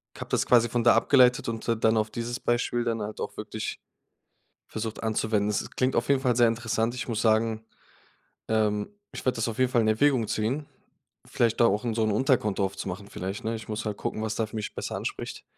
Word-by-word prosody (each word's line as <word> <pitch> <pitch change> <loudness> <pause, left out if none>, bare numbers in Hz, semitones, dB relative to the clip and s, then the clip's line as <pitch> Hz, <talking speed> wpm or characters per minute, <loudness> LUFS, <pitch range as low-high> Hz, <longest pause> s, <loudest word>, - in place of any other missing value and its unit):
habe - - -8
das - - +1
quasi 120 -1 +4
von 120 +1 0
da 120 - +7
abgeleitet 125 -4 +4
und 115 -1 -5
d 115 - +2
dann 110 0 +2
auf 110 0 0
dieses 120 +1 -4
Beispiel 120 0 0
dann 115 -2 -1
halt 105 +1 -5
auch - - -5
wirklich - - -5 0.9
versucht 110 0 -5
anzuwenden. 110 -2 0
Es 105 - 0
es - - -10
klingt 130 +1 0
auf 120 - 0
jeden 140 -2 +4
Fall 125 -3 +1
sehr 120 -1 +5
interessant. 115 0 -1
Ich 125 - -5
muss 110 -3 -1
sagen, 110 0 +2 0.8
ähm, 105 - +1 0.2
ich - - -6
werde 130 - +1
das 115 0 -1
auf 115 +1 -5
jeden 130 -1 +3
Fall 120 - +4
in 110 - +1
Erwägung 120 +1 +3
ziehen, 130 +8 -1 0.6
vielleicht 115 -2 0
da 120 - +7
auch 105 +2 +1
in 115 -2 -1
so 110 0 +1
'n 110 - +1
Unterkonto 105 -4 +2
aufzumachen 95 0 -5
vielleicht, 95 +2 -5
ne? 115 +1 -1
Ich 110 - -10
muss 105 +1 -3
halt 105 -2 -3
gucken, 110 - -3
was 110 -1 -2
da 115 - 0
für 110 - -9
mich 105 -1 -4
besser - - -4
anspricht. - - -5
115 Hz, 225 wpm, -27 LUFS, 110-120 Hz, 0.9 s, da